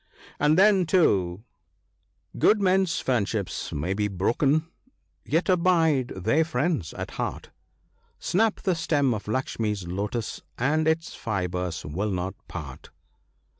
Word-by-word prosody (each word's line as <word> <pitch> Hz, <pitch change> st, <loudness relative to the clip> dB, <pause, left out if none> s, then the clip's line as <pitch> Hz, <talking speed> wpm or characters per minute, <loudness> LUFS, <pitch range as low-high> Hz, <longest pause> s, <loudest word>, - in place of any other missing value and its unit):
" -, -, -22 dB
And 150 Hz, +2 st, +3 dB
then, 195 Hz, -2 st, +5 dB
too, 100 Hz, -, +2 dB, 0.5 s
''* -, -, -46 dB, 0.3 s
Good 215 Hz, -, +5 dB
men's 190 Hz, -4 st, +2 dB
friendships 105 Hz, -6 st, -1 dB
may 80 Hz, +6 st, -2 dB
be 105 Hz, +1 st, 0 dB
broken, 135 Hz, -, +1 dB, 0.6 s
yet 165 Hz, +4 st, +1 dB
abide 170 Hz, -7 st, +3 dB
they 110 Hz, -, +2 dB
friends 160 Hz, -, -1 dB
at -, -, -5 dB
heart; -, -, -4 dB, 0.7 s
Snap 215 Hz, +4 st, +1 dB
the 190 Hz, -, +1 dB
stem 145 Hz, -6 st, +1 dB
of 105 Hz, -1 st, -6 dB
Luxmee's 105 Hz, -5 st, -2 dB
lotus, 105 Hz, +5 st, -3 dB, 0.2 s
and 155 Hz, +5 st, +1 dB
its 160 Hz, +1 st, 0 dB
fibres 90 Hz, -5 st, -3 dB
will 95 Hz, +9 st, -2 dB
not 95 Hz, 0 st, -2 dB
part. 75 Hz, -6 st, -8 dB
125 Hz, 130 wpm, -26 LUFS, -, 0.7 s, then